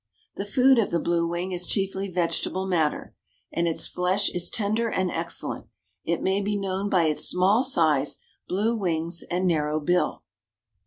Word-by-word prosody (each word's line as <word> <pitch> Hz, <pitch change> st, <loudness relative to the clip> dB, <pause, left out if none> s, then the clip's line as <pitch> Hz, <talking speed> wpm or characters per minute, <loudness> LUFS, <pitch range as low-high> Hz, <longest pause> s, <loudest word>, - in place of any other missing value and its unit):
The 200 Hz, -, -5 dB
food 255 Hz, +4 st, +5 dB
of 220 Hz, -, +1 dB
the 170 Hz, -, 0 dB
blue 170 Hz, 0 st, +1 dB
wing 175 Hz, +2 st, -3 dB
is 180 Hz, -1 st, -2 dB
chiefly 195 Hz, -1 st, -1 dB
vegetable 180 Hz, +1 st, -1 dB
matter, 165 Hz, -5 st, 0 dB, 0.4 s
and 170 Hz, 0 st, +1 dB
its 165 Hz, -, 0 dB
flesh 185 Hz, +3 st, 0 dB
is 175 Hz, -1 st, 0 dB
tender 220 Hz, +2 st, 0 dB
and 185 Hz, -4 st, 0 dB
excellent. 170 Hz, +1 st, -3 dB, 0.4 s
It 170 Hz, 0 st, -1 dB
may 190 Hz, +1 st, +1 dB
be 205 Hz, +1 st, -1 dB
known 195 Hz, 0 st, -2 dB
by 180 Hz, -4 st, +3 dB
its 155 Hz, -2 st, 0 dB
small 195 Hz, +7 st, +3 dB
size, 155 Hz, -, +2 dB, 0.3 s
blue 215 Hz, +5 st, 0 dB
wings, 170 Hz, -4 st, -1 dB
and 180 Hz, +2 st, 0 dB
narrow 155 Hz, -3 st, +1 dB
bill. 175 Hz, +4 st, 0 dB
180 Hz, 165 wpm, -25 LUFS, 170-200 Hz, 0.4 s, food